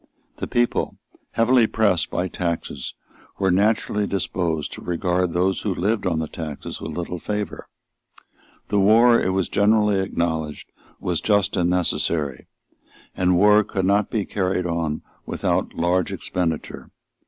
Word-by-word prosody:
The - - -4
people, 120 -1 0 0.4
heavily 115 0 +4
pressed 100 -7 +1
by 90 - -1
taxes, 85 -7 -4 0.4
were 95 -1 +2
naturally 105 +1 +1
disposed 85 -5 -2
to - - -8
regard 90 0 0
those 90 +3 +1
who 100 -4 -1
lived 100 +3 0
on 85 -3 0
the 80 0 -1
taxes 75 -4 -6
with - - -5
little 90 0 -4
favour. 105 +2 -4 1.0
The 105 - +2
war, 115 +4 +6
it - - +1
was 95 -1 0
generally 105 -1 +3
acknowledged, 80 -5 -2 0.3
was 90 -2 -1
just 100 -2 +2
and 90 -2 +2
necessary; 80 -6 -1 0.7
and 90 -1 +2
war 105 +3 +6
could 95 -1 -2
not 100 +2 +2
be 105 -4 -1
carried 95 -2 -1
on 85 -3 -2 0.2
without - - -1
large 90 +1 +1
expenditure. 85 -4 -3
90 Hz, 140 wpm, -23 LUFS, 85-105 Hz, 1.0 s, war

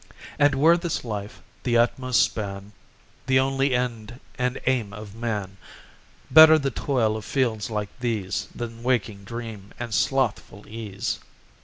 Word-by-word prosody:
And 145 -1 +4
were 160 +5 +5
this 170 -2 -3
life 105 -2 -6 0.2
the 120 -2 +1
utmost 125 +1 +3
span, 100 -1 -4 0.6
The 130 0 +4
only 135 0 +1
end 120 -1 -3 0.2
and 125 +1 -1
aim 120 -6 0
of 105 -1 -9
man, 105 -4 -4 0.7
Better 160 0 +9
the 140 -3 -1
toil 115 -4 0
of 110 - -5
fields 115 -5 -1
like 105 -2 -3
these 110 -6 -2
Than 115 -1 -6
waking 110 -5 -1
dream 110 -3 -8
and 120 -2 -5
slothful 115 -5 0
ease. 105 -3 -4
115 Hz, 140 wpm, -25 LUFS, 105-130 Hz, 0.7 s, Better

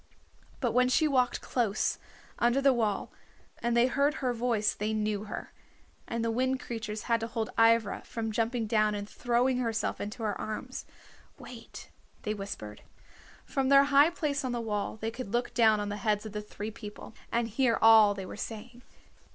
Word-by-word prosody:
But 240 -4 +1
when 250 +2 +3
she 310 +4 +3
walked 255 -4 +1
close 220 -4 0 0.4
under 240 +3 +3
the 275 -1 +4
wall 220 -4 -1 0.5
and 235 0 0
they 235 - +6
heard 280 +4 +1
her 255 -3 -1
voice 230 -3 +1
they 215 +1 -2
knew 210 -1 -1
her, - - -7 0.5
and 230 0 -2
the 230 - +1
Wind 260 +3 0
Creatures 215 -3 -5
had 230 -1 +1
to 225 - -3
hold 225 -1 -3
Ivra 225 -2 +3
from 225 -1 -4
jumping 230 +2 0
down 215 -1 +2
and 205 0 -5
throwing 250 +1 +1
herself 230 -3 -1
into 210 +3 -5
her 210 -2 -1
arms. 235 +4 -5 0.5
"Wait," - - -11 0.3
they 210 - -1
whispered. 195 - -7 0.6
From 270 -1 -1
their 275 0 +7
high 285 +3 +7
place 295 -4 -2
on 255 -2 -2
the 240 - -2
wall 215 -2 -3
they 225 +1 -2
could 235 -3 -7
look 240 0 0
down 220 -3 +4
on 205 0 -3
the 205 - -3
heads 210 0 0
of 215 - -6
the 210 +1 -4
three 210 +1 -7
people, 210 -1 -10 0.2
and 235 0 +1
hear 230 +1 +1
all 220 -2 +7
they 195 -1 -6
were - - -8
saying. 230 +3 -7
230 Hz, 185 wpm, -29 LUFS, 215-250 Hz, 0.6 s, their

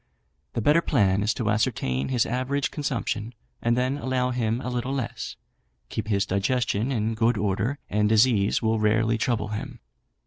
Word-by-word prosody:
The 115 - -1
better 150 +6 +5
plan 100 - +2
is 105 +2 +2
to 110 -4 0
ascertain 105 - 0
his 125 -3 +2
average 130 +3 -1
consumption, 120 -5 -3 0.3
and 120 +1 +1
then 130 +3 0
allow 130 -1 0
him 115 -2 0
a 130 - -4
little 125 +2 -2
less. 130 -5 -4 0.5
Keep 110 -1 -4
his 100 -2 +1
digestion 110 +4 0
in 110 -3 0
good 115 +1 +2
order, 105 +7 0
and 105 0 +1
disease 110 -2 +3
will 110 0 +2
rarely 110 +1 +2
trouble 110 -3 0
him. 105 0 -5
115 Hz, 165 wpm, -25 LUFS, 105-125 Hz, 0.5 s, better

